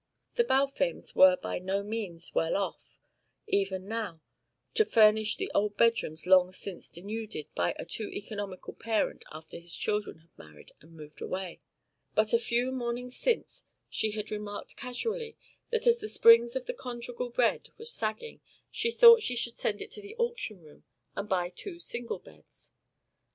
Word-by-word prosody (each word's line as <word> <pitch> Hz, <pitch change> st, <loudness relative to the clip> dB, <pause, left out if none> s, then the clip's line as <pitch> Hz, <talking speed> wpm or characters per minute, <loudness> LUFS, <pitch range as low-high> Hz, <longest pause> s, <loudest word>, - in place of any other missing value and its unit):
The 475 Hz, -, +3 dB
Balfames 275 Hz, -, 0 dB
were 280 Hz, -1 st, +8 dB
by -, -, -4 dB
no 190 Hz, +2 st, -1 dB
means 200 Hz, -6 st, -5 dB
well 165 Hz, -, +2 dB
enough 200 Hz, -, +2 dB
off, -, -, -32 dB, 0.5 s
even 195 Hz, -1 st, 0 dB
now, 220 Hz, -7 st, -3 dB, 0.5 s
to 440 Hz, -, +5 dB
refurnish 215 Hz, -, +5 dB
the 390 Hz, -, -3 dB
old 205 Hz, 0 st, +1 dB
bedrooms 230 Hz, -9 st, +2 dB
long 185 Hz, -1 st, +6 dB
since 185 Hz, -1 st, -6 dB
denuded 205 Hz, -3 st, -6 dB
by 85 Hz, -, 0 dB
a -, -, -5 dB
too 215 Hz, -, -4 dB
economical 205 Hz, -2 st, -6 dB
parent 225 Hz, -2 st, -1 dB
after 155 Hz, +1 st, -9 dB
his 170 Hz, 0 st, -7 dB
children 210 Hz, -4 st, -2 dB
had 165 Hz, -, -31 dB
married 75 Hz, -1 st, -14 dB
and 160 Hz, +2 st, -17 dB
moved 150 Hz, -1 st, -12 dB
away, 185 Hz, -2 st, -4 dB, 0.5 s
but -, -, +3 dB
a 465 Hz, -, +6 dB
few 245 Hz, -, 0 dB
mornings 245 Hz, 0 st, -3 dB
since -, -, -1 dB, 0.3 s
she 215 Hz, -1 st, 0 dB
had 210 Hz, 0 st, -4 dB
remarked 210 Hz, -1 st, -6 dB
casually 450 Hz, -, -4 dB, 0.3 s
that 470 Hz, 0 st, 0 dB
as 475 Hz, 0 st, +5 dB
the 430 Hz, -, -5 dB
springs 230 Hz, +1 st, +6 dB
of 260 Hz, -, -2 dB
the -, -, -3 dB
conjugal 245 Hz, -, -5 dB
bed 240 Hz, 0 st, +1 dB
were 455 Hz, -, -10 dB
sagging 225 Hz, -, -3 dB, 0.3 s
she 465 Hz, -, 0 dB
thought 465 Hz, 0 st, +9 dB
she 250 Hz, -, -1 dB
should 235 Hz, 0 st, -1 dB
send 205 Hz, -1 st, -1 dB
it -, -, -13 dB
to 420 Hz, -, -5 dB
the 405 Hz, +2 st, -10 dB
auction 470 Hz, -, -2 dB
room 150 Hz, -1 st, -17 dB, 0.3 s
and 200 Hz, +1 st, -4 dB
buy 180 Hz, -3 st, +1 dB
two 375 Hz, -4 st, -7 dB
single 240 Hz, -8 st, -5 dB
beds. -, -, -19 dB
225 Hz, 170 wpm, -30 LUFS, 195-275 Hz, 0.5 s, thought